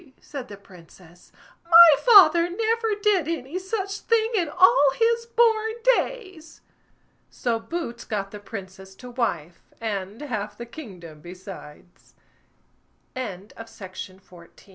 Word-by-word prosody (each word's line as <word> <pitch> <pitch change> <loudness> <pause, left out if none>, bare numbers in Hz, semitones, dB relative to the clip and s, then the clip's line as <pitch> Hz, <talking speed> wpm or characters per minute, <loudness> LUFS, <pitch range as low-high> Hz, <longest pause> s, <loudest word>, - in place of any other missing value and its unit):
said 275 -4 -9
the 205 - -11
Princess; 175 -2 -18 0.3
"my 335 -3 +8
father 350 -7 +6
never 450 +3 -1
did 405 -6 +1
any 325 +1 -4
such 390 +1 -4
thing 455 0 0
in 355 -8 0
all 295 -4 +5
his 465 0 +1
born 450 -2 +2 0.2
days!" 380 -12 -6 0.7
So 235 -2 -2
Boots 240 -3 -6
got 195 -2 -4
the 210 - -9
Princess 190 -2 -10
to 250 +4 -12
wife, 175 - -3 0.2
and 205 -1 -5
half 220 -8 -5
the 235 - -7
kingdom 185 - -12
besides. 180 -2 -13 1.0
THE 260 - -5
TWELVE 180 -2 -9
WILD 205 - -20
DUCKS 210 -5 -10
On 180 -2 -18
250 Hz, 130 wpm, -24 LUFS, -, 1.0 s, my